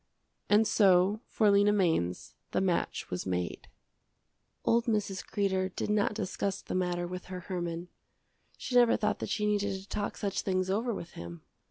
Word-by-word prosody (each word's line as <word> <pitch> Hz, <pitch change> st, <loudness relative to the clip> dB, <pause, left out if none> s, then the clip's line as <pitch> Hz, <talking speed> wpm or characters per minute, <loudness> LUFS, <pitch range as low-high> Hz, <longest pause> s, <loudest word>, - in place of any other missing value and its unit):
And 210 Hz, +1 st, +5 dB
so 195 Hz, 0 st, +4 dB
for 210 Hz, -2 st, +3 dB
Lena 200 Hz, +1 st, +5 dB
Mainz 160 Hz, -, 0 dB, 0.2 s
the -, -, +2 dB
match 185 Hz, -2 st, -1 dB
was 90 Hz, +1 st, -3 dB
made. 90 Hz, -1 st, -3 dB, 1.0 s
Old 235 Hz, 0 st, +3 dB
Mrs. 205 Hz, -5 st, -1 dB
Kreder 190 Hz, -2 st, 0 dB
did -, -, -1 dB
not 210 Hz, 0 st, +1 dB
discuss 200 Hz, -1 st, -2 dB
the -, -, -5 dB
matter 180 Hz, -1 st, 0 dB
with 180 Hz, +1 st, -6 dB
her 185 Hz, -1 st, -6 dB
Herman. 175 Hz, -2 st, -4 dB, 0.7 s
She -, -, -6 dB
never 245 Hz, -1 st, +6 dB
thought 210 Hz, -1 st, 0 dB
that -, -, -4 dB
she 210 Hz, -, 0 dB
needed 205 Hz, -1 st, +1 dB
to 195 Hz, -, -14 dB
talk 205 Hz, -1 st, -3 dB
such 200 Hz, -2 st, -1 dB
things 185 Hz, -1 st, 0 dB
over 230 Hz, +5 st, 0 dB
with 175 Hz, -5 st, -6 dB
him. 85 Hz, -1 st, -9 dB
195 Hz, 170 wpm, -30 LUFS, 180-210 Hz, 1.0 s, never